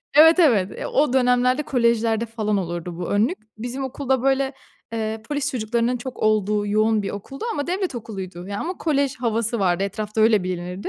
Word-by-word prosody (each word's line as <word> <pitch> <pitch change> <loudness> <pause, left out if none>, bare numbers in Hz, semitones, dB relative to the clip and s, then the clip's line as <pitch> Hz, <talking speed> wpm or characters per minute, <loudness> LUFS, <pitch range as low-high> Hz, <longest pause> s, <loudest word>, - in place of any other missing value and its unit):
Evet, 320 +3 +8
evet. 225 - +4
Eee, - - -6
o 290 -2 +2
dönemlerde 250 +1 +3
kolejlerde 235 -4 +1
falan 215 -2 -1
olurdu 175 -2 -4
bu 175 - -4
önlük. 220 - +2 0.2
Bizim 245 +4 -4
okul 265 +1 -6
da 265 -2 +2
böyle, 270 0 +2 0.4
eee, 220 -1 -3
polis 290 -1 -1
çocuklarının 235 +1 0
çok 255 +1 -7
olduğu 210 -1 +1
yoğun 215 +1 +2
bir 195 - -3
okuldu. 235 - -7
Ama 285 - -3
devlet 365 -2 -2
okuluydu. 190 -6 -7
Ya, 200 0 -4
ama 360 +2 -4
kolej 280 -3 0
havası 230 -1 -1
vardı 185 -2 +1
etrafta 210 +2 -3
öyle 215 -2 +5
bilinirdi. 180 +1 -4
230 Hz, 180 wpm, -23 LUFS, 205-265 Hz, 0.4 s, Evet